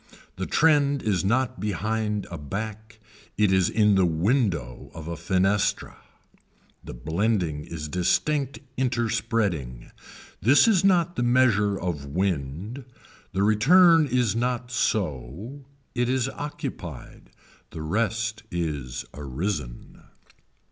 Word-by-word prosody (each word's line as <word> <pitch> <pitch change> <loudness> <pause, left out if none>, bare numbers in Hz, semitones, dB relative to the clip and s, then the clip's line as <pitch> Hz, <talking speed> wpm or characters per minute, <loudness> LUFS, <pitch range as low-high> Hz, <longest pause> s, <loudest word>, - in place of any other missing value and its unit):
The - - -4
trend 145 -3 +3
is 100 -5 +1
not 120 +2 0
behind 105 +2 -2
a 85 - -5
back. 110 +7 -6 0.4
It 105 -3 +3
is 95 -1 +3
in 105 -2 +3
the 95 -1 +4
window 85 - 0
of 80 -1 -8
a 85 - -4
fenestra. 100 +3 0 0.9
The - - -8
blending 80 - -1
is 75 -2 -6
distinct 135 - 0 0.2
interspreading. 110 - -1 0.5
This 130 - +5
is 195 -6 +4
not 175 -3 +3
the - - 0
measure 120 -5 +3
of 75 -6 -4
wind. 90 - -2 0.5
The 95 +1 +1
return 160 - +5
is 125 -4 +1
not 125 +1 -1
so, 105 - -2 0.3
it 125 0 0
is 130 -1 +1
occupied. 145 +2 -7 0.4
The 80 -2 -7
rest 110 +5 -1
is 75 - -3
arisen. 70 -1 -5
105 Hz, 115 wpm, -25 LUFS, 85-120 Hz, 0.9 s, This